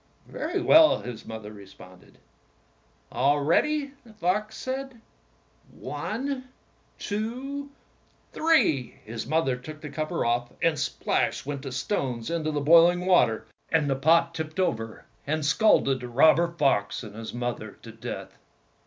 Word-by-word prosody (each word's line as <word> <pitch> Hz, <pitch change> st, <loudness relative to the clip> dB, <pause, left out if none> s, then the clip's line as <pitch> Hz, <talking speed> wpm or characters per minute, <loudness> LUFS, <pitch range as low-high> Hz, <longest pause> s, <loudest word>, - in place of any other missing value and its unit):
"Very 350 Hz, +5 st, -3 dB
well," 315 Hz, -3 st, +6 dB
his 120 Hz, -3 st, -8 dB
mother 110 Hz, -2 st, -7 dB
responded. 95 Hz, -2 st, -15 dB, 0.9 s
"All 140 Hz, +4 st, +2 dB
ready," 280 Hz, -, +1 dB
the 225 Hz, -2 st, -17 dB
fox 210 Hz, +3 st, -1 dB
said; 265 Hz, -1 st, -5 dB, 0.7 s
"one, 260 Hz, +3 st, -5 dB, 0.5 s
two, 255 Hz, +7 st, -4 dB, 0.6 s
three!" 305 Hz, -, +2 dB
His 115 Hz, +1 st, -6 dB
mother 155 Hz, -3 st, +1 dB
took 150 Hz, +5 st, -10 dB
the 150 Hz, -2 st, -8 dB
cover 155 Hz, +1 st, -2 dB
off, 120 Hz, +1 st, 0 dB
and 160 Hz, -3 st, +1 dB
splash -, -, -1 dB
went 140 Hz, -1 st, -4 dB
the 135 Hz, -1 st, -6 dB
stones 130 Hz, -, -2 dB
into 160 Hz, -2 st, -1 dB
the 150 Hz, -1 st, -1 dB
boiling 170 Hz, +4 st, +5 dB
water, 125 Hz, -12 st, +3 dB, 0.2 s
and 160 Hz, -3 st, +2 dB
the 135 Hz, -, +1 dB
pot 165 Hz, +4 st, +3 dB
tipped 160 Hz, +1 st, -5 dB
over 115 Hz, -11 st, -2 dB, 0.2 s
and 155 Hz, 0 st, -1 dB
scalded 150 Hz, -6 st, +3 dB
the 125 Hz, -, -7 dB
robber 155 Hz, +7 st, +5 dB
fox 135 Hz, -11 st, 0 dB
and 105 Hz, -3 st, -9 dB
his 115 Hz, 0 st, -7 dB
mother 120 Hz, -3 st, -5 dB
to 115 Hz, -, -9 dB
death. 115 Hz, 0 st, -8 dB
155 Hz, 135 wpm, -26 LUFS, -, 0.9 s, well